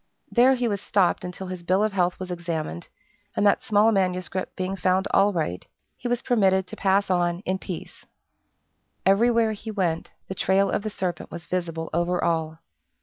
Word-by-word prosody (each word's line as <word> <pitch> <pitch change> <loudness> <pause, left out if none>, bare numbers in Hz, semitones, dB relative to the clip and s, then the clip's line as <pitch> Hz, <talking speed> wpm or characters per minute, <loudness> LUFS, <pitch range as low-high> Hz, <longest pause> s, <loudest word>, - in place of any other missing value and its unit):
There 255 +2 +5
he 245 -1 0
was 200 -3 -2
stopped 195 -3 +1
until 180 +1 -6
his 185 -1 -6
bill 185 +4 +2
of 215 -2 0
health 180 -2 +1
was 185 -1 -5
examined, 165 - -4 0.5
and - - +1
that 200 - +4
small 215 +1 +3
manuscript 185 -2 -1
being 185 +1 -2
found 185 +1 +1
all 200 +1 +4
right, 155 - -2 0.3
he 245 - -5
was 245 0 -1
permitted 190 -6 +3
to - - -8
pass 195 0 +2
on 175 0 +1
in 190 -1 -2
peace. 180 -4 -8 1.0
Everywhere 225 +3 +4
he 215 +1 -7
went, 180 -6 -1 0.2
the - - -4
trail 190 +1 +2
of - - 0
the 215 - -3
serpent 185 -4 -4
was 170 -1 -8
visible 165 -3 -3
over 175 +2 0
all. 160 -2 0
185 Hz, 180 wpm, -25 LUFS, 175-205 Hz, 1.0 s, There